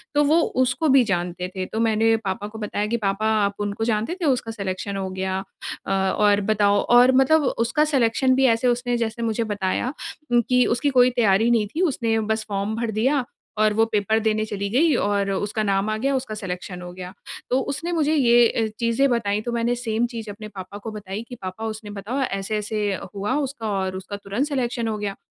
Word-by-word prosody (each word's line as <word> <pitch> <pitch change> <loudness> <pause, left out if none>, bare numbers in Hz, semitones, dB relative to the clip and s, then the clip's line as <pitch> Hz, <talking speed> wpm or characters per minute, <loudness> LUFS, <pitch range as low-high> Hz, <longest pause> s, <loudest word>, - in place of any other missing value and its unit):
तो 295 - +5
वो 305 +3 +4 0.3
उसको 280 +6 0
भी 260 - +6
जानते 175 +1 -3
थे। 185 - -2
तो 220 - -5
मैंने 225 0 +3
पापा 195 +2 -2
को 220 +1 -9
बताया 210 -1 -2
कि 235 - 0
पापा 195 +3 0 0.2
आप 200 0 -2
उनको 205 +1 -2
जानते 225 +8 0
थे, - - 0
उसका 255 -5 +1
सिलेक्शन 200 -1 -4
हो 190 -1 -3
गया। 190 0 -2 0.5
अ, - - -3
और 200 +2 +2
बताओ 205 -1 +3 0.2
और 250 +1 +6
मतलब 290 +4 +4
उसका 235 +7 +2
सिलेक्शन 255 +1 +3
भी 265 +1 +3
ऐसे 240 +2 -1
उसने 245 0 +1
जैसे 230 0 -3
मुझे 225 0 0
बताया 200 +7 -1 0.4
उम, 240 - +5
कि 250 0 +4
उसकी 245 +5 +1
कोई 250 -2 +5
तैयारी 220 0 +3
नहीं 225 -3 +3
थी, 340 - 0
उसने 235 -9 +1
बस 220 0 -1
फॉर्म 200 +2 -2
भर 230 0 -2
दिया 260 +6 +1 0.3
और 215 0 +3
वो 225 +1 +3
पेपर 215 +1 +2
देने 215 -1 0
चली 200 -1 -3
गई 290 +7 +3
और 205 -3 0
उसका 205 +3 -1
नाम 200 0 +1
आ 215 - -1
गया, 270 +5 0
उसका 255 -5 -3
सिलेक्शन 180 -3 -6
हो 180 - -8
गया। 180 0 -8 0.4
तो 255 - +2
उसने 335 +5 -4
मुझे 315 -3 +1
ये 240 -4 +5
ए 225 0 -1
चीज़ें 235 +3 +2
बताई 210 -4 0
तो 240 - -4
मैंने 235 +1 0
सेम 235 -1 -1
चीज़ 225 -2 -5
अपने 215 +1 -9
पापा 190 +2 -7
को 220 +2 -7
बताई 205 -1 -6
कि 250 - -7
पापा 185 +4 -5
उसने 215 -1 -6
बताया 255 +7 -1
ऐसे-ऐसे 210 +1 -2 0.3
हुआ 205 +6 -1
उसका 230 -5 -5
और 190 0 -2
उसका 195 +2 -7
तुरंत 205 +8 -2
सिलेक्शन 245 -5 -1
हो 215 - -2
गया। 205 -1 -3
220 Hz, 210 wpm, -23 LUFS, 200-245 Hz, 0.5 s, भी